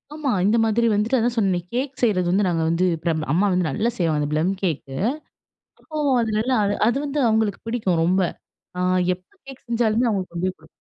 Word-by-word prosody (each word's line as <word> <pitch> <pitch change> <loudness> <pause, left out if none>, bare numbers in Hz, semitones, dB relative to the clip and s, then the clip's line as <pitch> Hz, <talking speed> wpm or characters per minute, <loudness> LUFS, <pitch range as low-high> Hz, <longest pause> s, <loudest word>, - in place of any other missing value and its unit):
ஆமா, 300 -3 -2 0.2
இந்த 215 +3 +3
மாதிரி 225 +1 +2
வந்துட்டு 215 +5 +1
அதான் 240 +1 0
சொன்னனே, 190 -4 +2
கேக் 265 +2 -2
செய்றது 195 -7 +2
வந்து 200 +2 +2
நாங்க 165 -2 0
வந்து 170 +3 +1 0.2
ப்ர 170 - +1 0.2
அம்மா 185 +5 +3
வந்து 180 -2 +1
நல்லா 215 - 0
செய்வாங்க 155 -4 0
ப்ளம் 160 +5 +1
கேக்கு. 150 -7 -3 0.8
அப்போ 310 - -12 0.3
அது 225 - -1
நல்லா 250 +3 +1 0.3
அது 240 - +2
வந்து 290 +1 -2
அவுங்களுக்கு 220 -2 +1
பிடிக்கும் 195 -8 0
ரொம்ப. 185 +3 +2 0.6
அ - - -3 0.4
எப்ப 180 +1 -29 0.2
கேக் 270 -1 -12
செஞ்சாலுமே 235 0 +2
அவுங்களுக்கு 190 -5 -3
கொண்டுபோயி 185 +2 -2
குடு 160 - -19
205 Hz, 185 wpm, -22 LUFS, 180-235 Hz, 0.8 s, இந்த